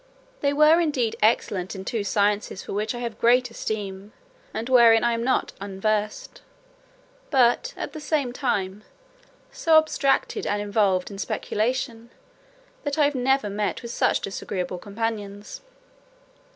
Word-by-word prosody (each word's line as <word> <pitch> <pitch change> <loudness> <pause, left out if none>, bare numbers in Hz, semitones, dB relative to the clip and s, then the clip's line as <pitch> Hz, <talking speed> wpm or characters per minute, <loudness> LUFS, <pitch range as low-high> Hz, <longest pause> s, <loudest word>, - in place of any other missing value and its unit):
They 280 - +1
were 305 +3 +5
indeed 280 -9 0
excellent 205 -4 +1
in 190 0 -7
two 220 -1 -2
sciences 205 -1 0
for - - -7
which 215 +4 -2
I - - -5
have 230 -3 -5
great 250 +1 +3
esteem, 205 -2 -5 0.4
and 225 +2 -4
wherein 235 -3 +6
I 235 0 +2
am 230 0 -2
not 260 +1 0
unversed; 205 +2 -2 0.9
but, 265 - +2
at - - -5
the 310 - -6
same 290 -5 -1
time, 210 -6 -2 0.7
so 325 -1 +4
abstracted 315 +5 +1
and 205 - 0
involved 205 -2 +1
in 195 - -8
speculation, 230 +2 -2 0.7
that 285 0 -2
I 295 -1 +4
never 265 -2 +1
met 205 +3 -2
with 235 - -6
such - - +1
disagreeable 185 -2 -4
companions. 205 -1 -5
225 Hz, 140 wpm, -24 LUFS, 205-255 Hz, 0.9 s, wherein